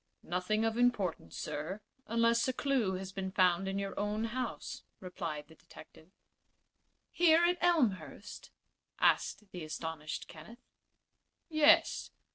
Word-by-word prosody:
"Nothing 185 +5 0
of 225 +1 0
importance, 200 - 0
sir, 155 +6 -4 0.3
unless 230 +1 +3
a 260 - 0
clew 250 -8 0
has 190 0 -6
been 190 -1 -4
found 185 -1 +3
in 195 0 -2
your 195 -1 -3
own 210 +1 -1
house," 235 +1 -4 0.2
replied 165 -5 -5
the 160 - -16
detective. 160 +1 -16 1.0
"Here 335 -1 +5
at 355 0 +2
Elmhurst?" 210 - 0 0.5
asked 210 -2 +1
the 180 -2 -6
astonished 155 0 -5
Kenneth. 170 +10 -13 0.8
"Yes. 325 +1 +4
200 Hz, 120 wpm, -33 LUFS, 175-240 Hz, 1.0 s, Here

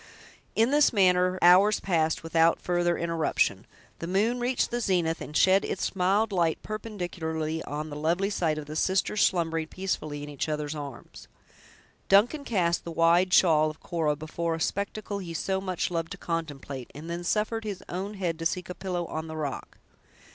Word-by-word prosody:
In 225 +4 +3
this 295 0 +5
manner 185 -3 +3
hours 190 +4 +6
passed 160 -4 0
without 165 0 +3
further 175 -1 0
interruption. 165 -2 0 0.3
The 165 - -5
moon 215 +7 +1
reached 245 +1 0
the 240 0 -1
zenith, 175 -6 0
and 150 - -3
shed 190 +1 +5
its 195 - -3
mild 195 +4 +2
light 170 -4 +1
perpendicularly 175 -7 -4
on 150 +1 -5
the - - -5
lovely 170 +7 0
sight 160 -6 0
of 155 - -5
the 150 +1 -7
sisters 190 +4 +1
slumbering 165 -3 +1
peacefully 155 -6 -4
in 145 - -7
each 145 +2 -3
other's 150 -1 -2
arms. 145 -4 -9 0.8
Duncan 235 +10 +4
cast 175 -6 +1
the - - -6
wide 170 +3 +3
shawl 155 -4 +5
of 155 - -10
Cora 160 -3 -1
before 165 +2 -3
a - - -6
spectacle 200 +3 -2
he 170 -3 -6
so 190 +4 -1
much 185 -2 -2
loved 165 -1 -2
to - - -9
contemplate, 145 -6 -5
and 155 +3 -8
then 170 +1 -4
suffered 215 +4 0
his 205 -4 -5
own 195 +4 -4
head 175 -4 -2
to 165 - -4
seek 180 +2 -5
a - - -3
pillow 180 -2 -3
on 160 0 -5
the 160 0 -6
rock. 145 -3 -5
175 Hz, 180 wpm, -27 LUFS, 160-195 Hz, 0.8 s, hours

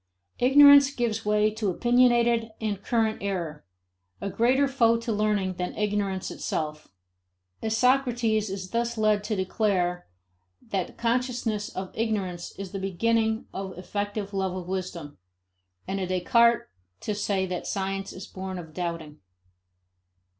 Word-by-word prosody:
Ignorance 285 +2 +8
gives 230 -5 -2
way 210 0 +3
to 215 -2 -2
opinionated 240 +1 +3
and 210 -3 -2
current 220 0 0
error, 170 -7 -3 0.6
a 200 - -4
greater 260 +6 +3
foe 230 -4 +3
to 230 0 -4
learning 205 -3 0
than 180 - -3
ignorance 205 -3 -1
itself. 150 -1 -4 0.7
A 220 - -2
Socrates 235 -3 +2
is 185 -1 -6
thus 235 0 -1
led 215 -1 +2
to 215 - -1
declare 185 - 0 0.6
that 190 -3 -3
consciousness 235 -3 -1
of 185 0 -6
ignorance 200 -6 -2
is 195 -2 -6
the 195 - -4
beginning 220 +4 0
of 190 -2 -6
effective 205 +2 -4
love 190 -2 -1
of 180 -2 -6
wisdom, 180 - -5 0.7
and 195 +1 -2
a 185 - -2
Descartes 230 +6 +3 0.3
to 210 - -2
say 200 -2 0
that 180 -1 -4
science 195 0 -3
is 185 - -8
born 190 0 -6
of 160 -3 -9
doubting. 170 -3 -5
205 Hz, 135 wpm, -26 LUFS, 185-230 Hz, 0.7 s, Ignorance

